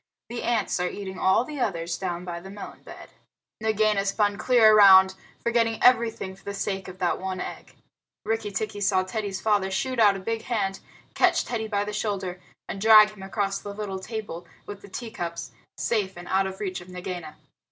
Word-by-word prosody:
The 240 0 -4
ants 235 -5 0
are 180 0 0
eating 190 -2 -7
all 190 +5 +3
the 295 0 -7
others 170 -7 -1
down 175 -1 -4
by 170 -1 -5
the 190 +3 -11
melon 200 +1 -9
bed." - - -12 0.5
Nagaina 215 -2 +2
spun 205 +1 +1
clear 220 -1 +5
round, 190 -2 +8 0.3
forgetting 230 -1 +1
everything 230 -6 +3
for 195 - -21
the 200 - -5
sake 195 -1 -3
of 185 0 -9
the 180 -2 +1
one 185 -1 -4
egg. - - -7 0.5
Rikki 225 -1 -1
tikki 205 +1 -4
saw 190 -1 +2
Teddy's 200 0 -4
father 205 -3 +2
shoot 255 +6 -2
out 205 -3 +6
a - - -5
big 225 +4 -3
hand, 200 -6 -2 0.3
catch - - +3
Teddy 220 -2 -3
by 205 -2 0
the 210 0 -5
shoulder, 195 -4 -3 0.3
and 195 - -6
drag 215 -1 +8
him 210 -2 -14
across 195 0 -2
the 205 0 -8
little 200 -2 -4
table 210 -4 -6 0.2
with 205 -1 -8
the 200 - -13
tea 230 +4 -6
cups, 170 - -5 0.3
safe 200 -5 -1
and 175 0 -9
out 190 0 +2
of 190 0 -7
reach 185 -3 -3
of 175 - -13
Nagaina. 180 -3 -7
200 Hz, 195 wpm, -26 LUFS, 190-215 Hz, 0.5 s, round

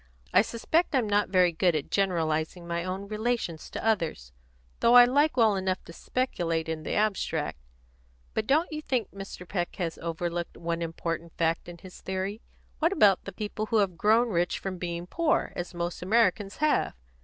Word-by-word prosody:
"I 185 - +7
suspect 295 - 0
I'm 245 -5 +2
not 205 0 +2
very 180 -2 +4
good 170 0 +2
at 150 - -3
generalising 170 -3 0
my 170 0 -2
own 190 +2 -4
relations 215 -6 -2
to - - -6
others, 165 - 0 0.5
though 235 - +5
I 245 0 +11
like 285 +4 +2
well 220 -4 +5
enough 190 -1 -1
to 165 - -12
speculate 170 -10 -1
in 160 -1 -3
the - - -4
abstract. 170 - 0 0.7
But 215 -1 -1
don't 315 +5 +2
you 305 0 -4
think 255 -8 -1
Mr. 195 -2 -9
Peck 175 -2 -2
has 170 -3 -3
overlooked 170 +1 -3
one 170 0 -3
important 165 0 -4
fact 165 +1 0
in 175 - -9
his 185 +1 -13
theory? 190 +3 -3 0.4
What 330 +2 +3
about 210 - +4
the - - -5
people 215 0 -4
who 225 - +1
have 195 -4 +2
grown 220 +7 +3
rich 175 -3 0
from 185 -2 -5
being 170 -1 -4
poor, 330 - 0
as 175 0 -5
most 170 0 -3
Americans 200 0 +2
have? 305 - +1
185 Hz, 180 wpm, -28 LUFS, 170-220 Hz, 0.7 s, I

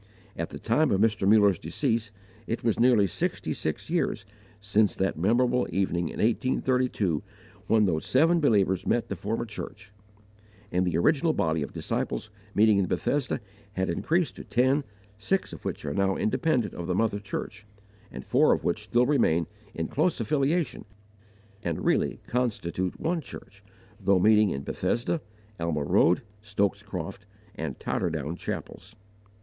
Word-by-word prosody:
At - - -3
the - - -7
time 145 +6 +2
of 95 - +2
Mr. 105 -2 +2
Muller's 100 -4 +5
decease 115 -1 -1 0.4
it 115 - -3
was 115 -2 +1
nearly 120 -4 +5
sixty 95 - -2
six 80 - -4
years 160 - -1 0.3
since 105 +1 +2
that 95 0 0
memorable 120 +8 +2
evening 85 -2 0
in - - -8
1832 125 - +1 0.5
when 110 -1 +4
those 80 -5 -1
seven 165 +6 +4
believers 100 - +2
met 120 - +1
to 100 - -2
form 105 +6 -2
a - - -3
church; 105 -1 -8 0.8
and 90 +1 +1
the 85 -2 +1
original 155 - +3
body 80 - 0
of 70 - -4
disciples 110 - -3 0.2
meeting 105 -1 +5
in 95 - +1
Bethesda 135 +2 -1 0.3
had 95 -2 -1
increased 165 - 0
to - - -7
ten, 130 +4 +2 0.4
six 190 - -1
of - - -10
which - - -4
are 70 - -2
now 95 +2 +1
independent 120 0 0
of 85 - -6
the 90 - 0
mother 105 0 +1
church, 105 +1 -6 0.4
and 65 - -8
four - - +4
of - - -2
which - - -1
still 120 +1 +3
remain 115 - +2 0.3
in 80 -1 -2
close 155 +4 0
affiliation 145 +7 0 0.8
and 85 -6 -3
really - - +1
constitute 95 -7 -2
one 165 0 0
church, 130 - -12 0.4
though 100 -1 +3
meeting 105 +2 +5
in 70 -4 -3
Bethesda, 125 - -1 0.4
Alma 85 -3 -1
Road, 90 - +3 0.2
Stokes 100 -1 0
Croft, 100 0 -6 0.3
and 80 - -5
Totterdown 80 +3 -2
chapels. 100 +4 -7
105 Hz, 155 wpm, -27 LUFS, 95-125 Hz, 0.8 s, Muller's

